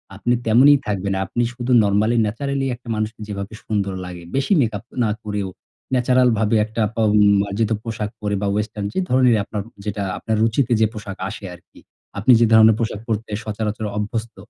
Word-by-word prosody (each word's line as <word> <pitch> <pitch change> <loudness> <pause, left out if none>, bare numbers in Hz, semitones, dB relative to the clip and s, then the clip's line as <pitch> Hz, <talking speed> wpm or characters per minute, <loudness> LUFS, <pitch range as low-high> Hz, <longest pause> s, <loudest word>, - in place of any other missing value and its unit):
আপনি 120 +5 0
তেমনই 130 +6 +6
থাকবেন। 100 -1 -1
আপনি 120 +6 -1
শুধু 125 0 -4
normally 105 +3 +2
naturally 135 +5 -2
একটা 125 0 -21
মানুষকে 110 0 -4
যেভাবে 100 0 -6
সুন্দর 100 -3 -1
লাগে। 90 -1 -8
বেশি 140 +8 +1
মেকআপ 110 -3 -2 0.2
না 110 - +1
করেও 105 -2 -3 0.5
natural 125 0 +3
ভাবে 110 +1 +1
একটা 110 +1 -4
বা 115 - +1 0.4
মার্জিত 100 +2 -1
পোশাক 110 -2 -4
পরে 105 -1 -1
বা, 100 - 0
western 105 0 -3
যে - - -1
ধরনেরই 125 -3 +4
আপনার 105 +1 -5 0.2
যেটা 105 -1 -3
আপনার 110 - -2
রুচিতে 115 +3 +1
যে - - +6
পোশাক 100 -3 -7
আসে 105 -1 -8
আরকি। 85 - -17 0.4
আপনি 110 +6 +4
যে 115 - +5
ধরনের 110 0 +7
পোশাক 110 -3 -2
পরতে 110 -1 -3
সচরাচর 110 0 -3
অভ্যস্ত, 110 +2 -3
110 Hz, 175 wpm, -21 LUFS, 105-115 Hz, 0.5 s, ধরনের